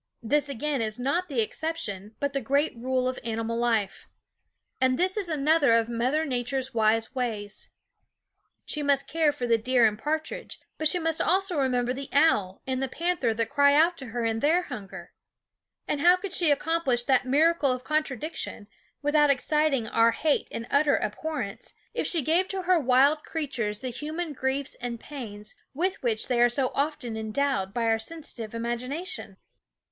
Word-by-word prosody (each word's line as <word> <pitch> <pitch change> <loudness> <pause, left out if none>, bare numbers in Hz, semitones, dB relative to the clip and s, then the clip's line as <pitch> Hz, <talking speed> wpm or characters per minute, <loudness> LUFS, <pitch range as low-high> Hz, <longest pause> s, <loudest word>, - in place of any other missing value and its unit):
This 290 +5 +1
again 280 0 -2
is 215 -1 -2
not 280 +9 0
the 260 -5 +1
exception, 215 - -4
but 285 -1 -1
the 275 - -1
great 280 +5 +1
rule 255 +2 -1
of 255 - -3
animal 230 0 -2
life. 230 -4 0 0.7
And 255 0 +3
this 370 +3 +2
is 400 -5 -2
another 300 -4 +3
of 230 0 +2
Mother 255 +7 0
Nature's 260 0 -2
wise 225 0 +2
ways. 215 -5 -3 1.0
She 300 - -3
must 280 -1 +2
care 320 -2 +2
for 250 - -4
the 230 -1 +3
deer 245 +1 +3
and 210 -1 +1
partridge; 315 +4 -4 0.2
but 310 - +3
she 360 - 0
must 325 -2 0
also 375 +1 +1
remember 250 -3 +1
the 270 +1 -7
owl 210 - +2
and 260 0 -2
the 270 - 0
panther 330 -4 0
that 225 0 -2
cry 285 0 +5
out 330 +4 +4
to 265 - -7
her 235 0 -3
in 225 0 0
their 330 +8 +3
hunger. 215 - -8 0.7
And 290 - -1
how 350 +3 +7
could 370 0 -6
she 335 -5 +4
accom 325 +4 +1
plish 240 -4 +2
that 260 0 +2
miracle 300 +1 +3
of 255 0 -3
contradiction 305 -5 -3 0.4
without 295 0 +4
exciting 280 -3 +1
our 230 +1 +3
hate 305 +3 +1
and 230 - -4
utter 285 +1 +4
abhorrence, 220 -1 -4 0.2
if - - -1
she 330 -5 +1
gave 340 +6 +2
to 380 -1 -4
her 360 -1 +4
wild 275 +3 +4
creatures 255 -10 -3
the 260 - -3
human 305 +6 -4
griefs 265 +1 -2
and 235 -1 -4
pains 215 -7 -8 0.2
with 370 +6 -1
which 230 -4 -1
they 245 -2 +1
are 240 - +6
so 255 +1 0
often 280 -5 -2
endowed 220 -2 -1
by 235 +3 -2
our 225 0 +2
sensitive 230 -5 -8
imagination? 245 - -4
265 Hz, 175 wpm, -27 LUFS, 230-310 Hz, 1.0 s, how